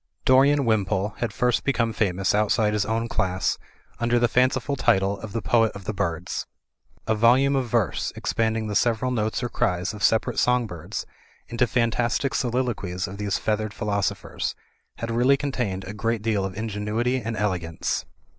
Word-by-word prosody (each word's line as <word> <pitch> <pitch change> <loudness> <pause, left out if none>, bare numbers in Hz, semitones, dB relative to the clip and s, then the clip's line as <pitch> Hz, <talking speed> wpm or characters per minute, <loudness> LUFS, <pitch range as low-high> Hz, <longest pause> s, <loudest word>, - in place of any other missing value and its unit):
Dorian 140 +2 +5
Wimpole 105 -3 +1
had 120 -3 -1
first 125 +3 +1
become 115 -4 +1
famous 95 -3 +1
outside 105 +1 +2
his 105 -1 0
own 115 +1 0
class 95 -4 0 0.4
under 120 +1 +2
the 120 0 +3
fanciful 130 +3 +1
title 95 -5 +2
of 110 0 -8
the 115 0 -3
Poet 115 -2 +3
of 100 - -9
the 110 - -3
Birds. 85 -2 -3 0.6
A 110 - +2
volume 125 +6 +4
of 130 -3 -1
verse, 115 -5 0
expand 110 -1 0
ing 110 - -2
the 105 - -3
several 120 +3 +1
notes 110 0 -1
or 120 - -1
cries 90 -2 0
of 105 - -9
separate 110 +3 +2
song 125 -1 +3
birds 85 -7 -6 0.4
into 120 +1 +1
fantastic 120 +3 0
soliloquies 120 -8 -1
of 95 +2 -8
these 100 -1 0
feathered 110 -1 -2
philosophers, 100 -2 -2 0.4
had 115 0 -4
really 125 +4 +4
contained 125 -10 -2
a 100 - -7
great 115 +1 -1
deal 105 -3 +1
of 95 0 -6
ingenuity 110 +4 -1
and 115 0 -4
elegance. 90 -6 -2
110 Hz, 170 wpm, -24 LUFS, 100-120 Hz, 0.6 s, Dorian